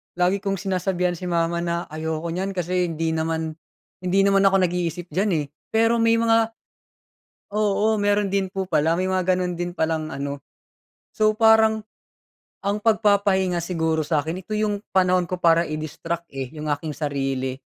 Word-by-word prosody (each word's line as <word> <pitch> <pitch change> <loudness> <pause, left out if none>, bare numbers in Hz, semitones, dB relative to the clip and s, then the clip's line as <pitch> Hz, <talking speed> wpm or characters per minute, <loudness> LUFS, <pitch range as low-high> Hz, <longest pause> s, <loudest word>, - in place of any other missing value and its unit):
lagi 180 +3 +2
kong 195 0 -1
sinasabihan 185 -2 0
si 180 +2 -6
mama 170 0 0
na 170 0 -1
ayoko 160 +1 -3
niyan 190 +2 -3
kasi 180 0 0
hindi 165 0 -2
naman, 160 0 -2 0.4
hindi 185 +1 +1
naman 195 0 +4
ako 195 -1 +3
nag-iisip 175 -1 -2
diyan, 195 +2 +1
eh, - - -7 0.3
pero 230 +1 +3
may 230 0 +4
mga 225 0 +3 1.0
oo 210 +1 +2
meron 205 0 +2
din 195 -1 +1
po 195 -1 -2
pala 165 -1 +2
may 185 - 0
mga 185 0 +2
ganun 180 -1 -2
din 175 0 -3
palang 160 -1 -1
ano. 140 0 -4 0.7
So, 215 0 +2
parang 220 -1 +4 0.8
ang 205 +1 0
pagpapahinga 200 -5 +2
siguro 160 -2 0
sa'kin 160 +3 -1
ito 215 - -15
yung 210 -1 -1
panahon 185 -2 +2
ko 185 - -2
para 170 -1 +4
i-distract, 155 +2 -4
eh, 135 -2 -4
yung 150 - -5
aking 150 +2 -2
sarili, 135 -3 -2
180 Hz, 160 wpm, -23 LUFS, 160-200 Hz, 1.0 s, naman